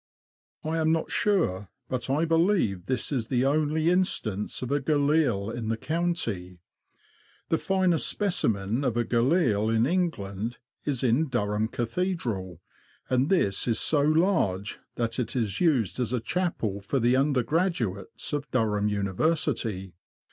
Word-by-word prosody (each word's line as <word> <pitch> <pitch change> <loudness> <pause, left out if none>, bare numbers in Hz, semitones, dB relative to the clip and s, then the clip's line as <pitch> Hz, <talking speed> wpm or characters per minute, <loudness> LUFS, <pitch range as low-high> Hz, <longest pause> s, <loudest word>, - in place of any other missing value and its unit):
I 160 +1 -1
am 160 0 +2
not 160 0 -1
sure, 105 - +1 0.2
but 130 0 -3
I 150 +5 +2
believe 165 - +1
this 130 0 -1
is 120 -6 -1
the 125 0 +1
only 155 +3 +2
instance 120 - -1
of 125 - -4
a 145 - +2
galille 145 -8 +1
in 115 -1 -5
the 115 - 0
county. 115 - -2 0.9
The 165 - +2
finest 185 -4 +2
specimen 115 - 0
of 120 -4 0
a 120 - +1
galille 120 - +2
in 115 +1 +3
England 120 - -2 0.3
is 140 -3 -1
in 130 +6 +2
Durham 105 -4 0
Cathedral, 115 - -3 0.5
and 130 +2 +2
this 100 - +1
is 115 -2 +1
so 150 -2 +2
large 150 - +1 0.2
that 115 0 -2
it 120 0 -2
is 110 -6 -1
used 130 - +2
as 125 -1 -1
a 125 - +1
chapel 115 - -2
for 130 +7 -1
the 120 +1 +3
undergraduates 135 - 0
of 145 0 -2
Durham 105 -4 +1
Uni 100 -2 -1
versity. 115 - 0
125 Hz, 145 wpm, -27 LUFS, 105-160 Hz, 0.9 s, in